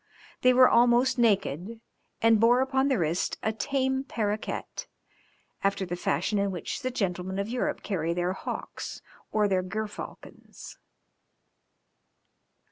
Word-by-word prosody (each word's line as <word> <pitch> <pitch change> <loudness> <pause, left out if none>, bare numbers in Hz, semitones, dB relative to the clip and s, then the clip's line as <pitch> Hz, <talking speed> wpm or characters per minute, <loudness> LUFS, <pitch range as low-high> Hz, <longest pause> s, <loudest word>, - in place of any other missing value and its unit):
They 255 - +6
were 255 0 +7
almost 240 +2 +4
naked, 205 -2 +1 0.4
and 225 -1 +5
bore 240 +3 +5
upon 265 0 +1
the 265 -3 +2
wrist 170 0 -1
a 220 - 0
tame 265 +2 0
parroquet, 215 -5 -2 1.0
after 195 -1 +1
the 175 -1 -4
fashion 180 +4 0
in 200 0 +1
which 180 -3 -4
the 255 - -1
gentlemen 190 -5 -2
of 200 +1 -1
Europe 245 +1 -2
carry 170 -5 -1
their 175 +1 0
hawks - - -6 0.3
or 210 -1 +2
their 190 -2 +1
gerfalcons. 215 +3 -8
215 Hz, 125 wpm, -27 LUFS, 185-245 Hz, 1.0 s, were